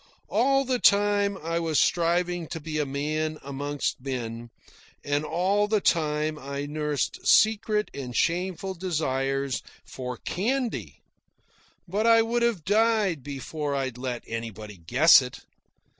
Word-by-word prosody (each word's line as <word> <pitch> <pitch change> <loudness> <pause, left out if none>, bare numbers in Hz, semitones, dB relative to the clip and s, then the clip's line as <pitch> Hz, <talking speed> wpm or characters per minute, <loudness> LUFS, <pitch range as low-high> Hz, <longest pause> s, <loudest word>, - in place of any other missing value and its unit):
All 270 +4 +2
the 255 -1 0
time 205 -1 +3
I 165 0 -2
was 160 -3 +1
striving 175 0 +1
to 165 - -5
be 155 0 -4
a 150 - 0
man 155 +3 -2
amongst 140 0 -3
men, 120 -3 -5 0.5
and 145 +1 0
all 190 +6 +1
the 215 0 +2
time 155 -3 0
I 140 +1 -5
nursed 150 -1 -2
secret 215 0 +3
and 125 -3 -6
shameful 185 +2 0
desires 135 -6 -1 0.2
for 125 -1 -6
candy. 240 +6 -3 0.8
But 205 +6 0
I 230 0 +6
would 235 +1 -1
have 235 -9 0
died 210 -5 +2
before 145 +2 -4
I'd 130 -3 -3
let 125 -2 -4
anybody 110 -3 -6
guess 125 - +6
it. 125 -1 -8
155 Hz, 130 wpm, -26 LUFS, 135-200 Hz, 0.8 s, I